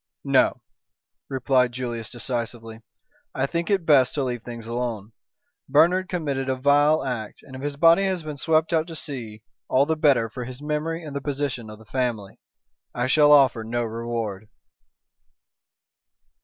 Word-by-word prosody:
"No," - - +2 0.7
replied 130 -2 +1
Julius 120 -3 -5
decisively. 115 -2 -5 0.5
"I 135 - +1
think 170 +5 -3
it 200 -2 +2
is - - -19
best 135 -5 +4
to 145 - 0
leave 125 -2 -3
things 115 -1 -8
alone. 115 -3 -4 0.6
Bernard 175 +7 +4
committed 140 -7 -2
a 130 - +1
vile 145 +3 +3
act, 120 -5 -5
and 130 - -12
if 130 - -8
his 145 0 -4
body 165 +4 +6
has 185 -3 -1
been 150 -2 -6
swept 160 +3 +1
out 160 0 +1
to 165 - -8
sea 120 -9 -6 0.2
all 135 +2 +3
the 160 +1 0
better 140 -7 +3
for 125 +3 -7
his 125 +1 -8
memory 155 +3 -3
and 150 -3 -8
the 140 - -2
position 140 -5 -3
of 105 - -10
the 110 - -17
family. 115 -5 -3 0.6
I 120 - 0
shall 145 +3 +5
offer 135 -6 +5
no 120 +2 -2
reward." 115 -3 -4
130 Hz, 165 wpm, -24 LUFS, 120-150 Hz, 0.7 s, body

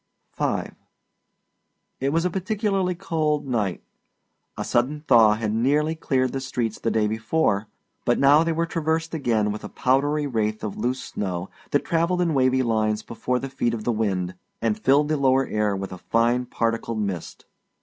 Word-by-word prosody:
V - - 0 1.4
It 135 - 0
was 165 +3 +1
a 180 - +1
particularly 195 -1 0
cold 155 -5 -1
night. 105 -8 -1 0.7
A - - -2
sudden 135 +5 0
thaw 115 -7 +5
had 110 -1 -2
nearly 145 +7 +2
cleared 130 -5 0
the 135 - -3
streets 120 -4 -3
the 115 - 0
day 110 -1 +2
before, 110 0 0 0.4
but - - +2
now 145 +3 +6
they 165 - 0
were 165 +1 0
traversed 165 -1 -1
again 115 -9 +1
with 105 - -6
a - - -6
powdery 145 +3 +1
wraith 110 -5 -1
of 105 -2 -3
loose 125 +2 -2
snow 90 -2 -4 0.2
that 145 - +1
travelled 170 +2 +1
in 165 -2 0
wavy 130 -1 +3
lines 110 -2 0
before 125 +2 -2
the 135 - -4
feet 120 -3 -1
of 110 - -6
the 120 - +1
wind, 95 -5 -1 0.3
and 110 -2 0
filled 140 +6 +3
the 155 0 0
lower 135 -1 +3
air 105 -3 0
with 95 -1 -5
a 90 - -9
fine 120 +4 +1
particled 115 -1 -1
mist. 100 -5 -4
125 Hz, 175 wpm, -24 LUFS, 110-150 Hz, 1.4 s, now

